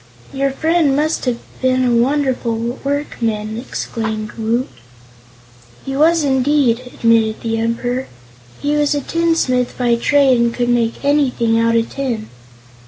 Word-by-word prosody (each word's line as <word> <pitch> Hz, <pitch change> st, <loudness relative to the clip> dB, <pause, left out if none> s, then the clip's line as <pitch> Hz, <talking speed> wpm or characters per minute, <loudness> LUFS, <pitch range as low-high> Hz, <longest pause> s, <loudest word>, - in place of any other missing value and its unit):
"Your 275 Hz, +1 st, 0 dB
friend 315 Hz, 0 st, +1 dB
must 305 Hz, +2 st, 0 dB
have 245 Hz, -2 st, 0 dB, 0.2 s
been 255 Hz, 0 st, +2 dB
a 240 Hz, -1 st, +2 dB
wonderful 260 Hz, -1 st, +1 dB, 0.3 s
workman!" 230 Hz, -7 st, -2 dB
exclaimed 220 Hz, -3 st, -4 dB
Woot. 230 Hz, +3 st, -1 dB, 1.2 s
"He 270 Hz, -, -4 dB
was, 320 Hz, +3 st, +3 dB
indeed," 265 Hz, -3 st, +2 dB
admitted 225 Hz, -1 st, +2 dB
the 225 Hz, -1 st, -2 dB
Emperor. 245 Hz, +3 st, -2 dB, 0.5 s
"He 290 Hz, +1 st, 0 dB
was 295 Hz, 0 st, +2 dB
a 290 Hz, -, -1 dB
tinsmith 325 Hz, -6 st, 0 dB
by 245 Hz, -2 st, +2 dB
trade 270 Hz, 0 st, +3 dB
and 235 Hz, 0 st, +2 dB
could 245 Hz, -1 st, 0 dB
make 240 Hz, +2 st, 0 dB
anything 255 Hz, -6 st, +2 dB
out 230 Hz, 0 st, +2 dB
of 230 Hz, 0 st, +2 dB
tin. 245 Hz, -6 st, -3 dB
250 Hz, 135 wpm, -17 LUFS, 230-285 Hz, 1.2 s, was